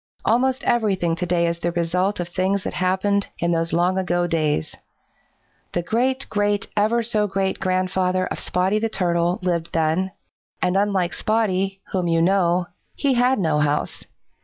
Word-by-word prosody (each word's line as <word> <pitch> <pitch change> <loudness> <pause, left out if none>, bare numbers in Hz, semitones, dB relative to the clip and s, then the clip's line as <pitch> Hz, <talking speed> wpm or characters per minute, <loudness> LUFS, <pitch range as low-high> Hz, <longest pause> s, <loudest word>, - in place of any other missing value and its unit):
Almost 260 +4 +2
everything 195 -8 +1
to 180 - -2
day 170 -1 +2
is 170 0 -1
the 175 - -1
result 180 +4 0
of 175 -1 -3
things 190 +2 0
that - - -4
happened 190 +2 +1
in 170 0 0
those 165 0 +1
long 180 +2 +2
ago 175 -1 0
days. 155 - -1 1.0
The 175 - -1
great 255 +7 0
great 205 -1 0
ever 220 +3 +2
so 215 -2 +1
great 190 -1 -1
grandfather 185 0 0
of - - -5
Spotty 190 +4 0
the 225 +1 -1
Turtle 175 -2 0
lived 170 -2 -1
then, 165 +4 +1 0.5
and 180 0 0
unlike 195 -3 +1
Spotty, 195 -3 0
whom 185 -2 0
you 165 -1 +2
know, 180 0 +2 0.3
he 280 -2 +1
had 250 +2 +3
no 160 -5 +1
house. 150 0 -1
185 Hz, 160 wpm, -22 LUFS, 170-205 Hz, 1.0 s, had